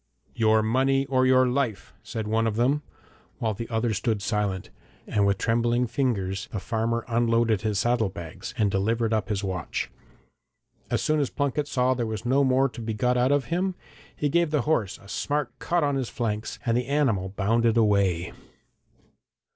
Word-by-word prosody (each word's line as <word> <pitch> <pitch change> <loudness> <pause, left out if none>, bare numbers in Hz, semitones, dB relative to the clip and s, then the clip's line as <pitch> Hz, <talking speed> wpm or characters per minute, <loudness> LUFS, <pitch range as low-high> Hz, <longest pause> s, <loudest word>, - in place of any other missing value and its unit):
'Your 110 -1 +3
money 135 +4 +2
or 130 -1 +2
your 130 0 +5
life,' 125 - -2
said 110 -2 -5
one 115 +1 +1
of 110 - -1
them, 130 +6 +2 0.6
while 110 -2 -1
the 115 +3 -6
other 115 0 0
stood 105 +2 0
silent; 100 -2 -2 0.3
and 100 -1 +1
with 100 - +2
trembling 120 +1 +1
fingers 110 -6 -1
the 105 - -3
farmer 115 +3 -1
unloaded 115 -3 +2
his 105 -2 -1
saddle 120 0 +2
bags, 85 +4 -8
and 105 -4 +2
delivered 115 +4 +1
up 110 -2 0
his 105 -1 -1
watch. 95 -4 -3 1.0
As - - 0
soon 155 0 +2
as 140 - 0
Plunket 145 +1 -1
saw 130 -2 +2
there 120 -3 -2
was 110 0 -5
no 135 +3 +3
more 130 +1 +3
to 125 -2 -9
be 110 -1 -3
got 125 +4 +1
out 125 +2 +3
of 145 -3 +2
him, 185 +1 0 0.4
he 150 - 0
gave 170 +2 +2
the 150 -2 +1
horse 120 - 0
a 100 - -17
smart 145 +4 -2
cut 175 -1 0
on 145 -1 +1
his 130 -3 -2
flanks, 110 -2 -3
and 115 -1 +2
the 125 0 0
animal 130 -10 +1
bounded 115 +4 +1
away. 100 -6 +2
115 Hz, 180 wpm, -26 LUFS, 105-130 Hz, 1.0 s, your